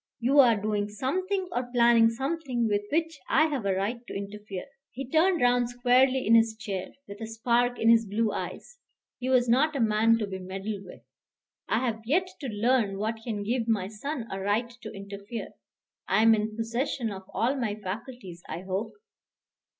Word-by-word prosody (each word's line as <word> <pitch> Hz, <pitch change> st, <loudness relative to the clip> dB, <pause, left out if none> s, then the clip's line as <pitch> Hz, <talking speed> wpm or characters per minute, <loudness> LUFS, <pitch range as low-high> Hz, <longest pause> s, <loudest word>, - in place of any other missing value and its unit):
You 260 Hz, +4 st, +3 dB
are 240 Hz, -4 st, +7 dB
doing 205 Hz, 0 st, -1 dB
something 370 Hz, -, -2 dB
or 245 Hz, -3 st, -2 dB
planning 235 Hz, -2 st, +5 dB
something 265 Hz, -1 st, -2 dB
with 205 Hz, -1 st, +1 dB
which 325 Hz, -1 st, 0 dB
I 310 Hz, -, +5 dB
have 265 Hz, -9 st, -2 dB
a 190 Hz, -, +1 dB
right 205 Hz, +6 st, -1 dB
to -, -, -7 dB
interfere." 200 Hz, -1 st, -6 dB, 0.2 s
He 270 Hz, +1 st, -7 dB
turned 330 Hz, +5 st, +3 dB
round 245 Hz, -1 st, +3 dB
squarely 255 Hz, +2 st, +3 dB
in 225 Hz, -, +4 dB
his 225 Hz, -1 st, +5 dB
chair, 195 Hz, -4 st, -4 dB, 0.2 s
with 200 Hz, +2 st, -10 dB
a 225 Hz, -, -4 dB
spark 240 Hz, +2 st, +1 dB
in 225 Hz, -, 0 dB
his 230 Hz, -1 st, +4 dB
blue 215 Hz, +2 st, 0 dB
eyes. 485 Hz, 0 st, -6 dB, 0.4 s
He 255 Hz, -, -3 dB
was 250 Hz, -2 st, +4 dB
not 280 Hz, +6 st, +3 dB
a -, -, -1 dB
man 225 Hz, 0 st, +4 dB
to 220 Hz, -, -1 dB
be 190 Hz, -1 st, -6 dB
meddled 195 Hz, +2 st, -5 dB
with. 180 Hz, -, -12 dB, 0.7 s
"I 235 Hz, +4 st, +1 dB
have 225 Hz, -2 st, -2 dB
yet 360 Hz, +8 st, +2 dB
to 275 Hz, -, -5 dB
learn 220 Hz, -2 st, +1 dB
what 220 Hz, +3 st, -2 dB
can 215 Hz, -4 st, -3 dB
give 235 Hz, +2 st, -1 dB
my 205 Hz, -4 st, 0 dB
son 245 Hz, +4 st, -5 dB
a 195 Hz, -, -3 dB
right 210 Hz, +5 st, 0 dB
to -, -, -7 dB
interfere. 200 Hz, +3 st, -7 dB, 0.6 s
I 215 Hz, -, +3 dB
am 225 Hz, 0 st, +7 dB
in 215 Hz, 0 st, -1 dB
possession 235 Hz, +1 st, -2 dB
of 190 Hz, -1 st, -9 dB
all 245 Hz, +5 st, +1 dB
my 235 Hz, -6 st, -2 dB
faculties, 205 Hz, -2 st, -7 dB
I 165 Hz, +3 st, -4 dB
hope." 190 Hz, +3 st, -3 dB
230 Hz, 190 wpm, -28 LUFS, 205-255 Hz, 0.7 s, are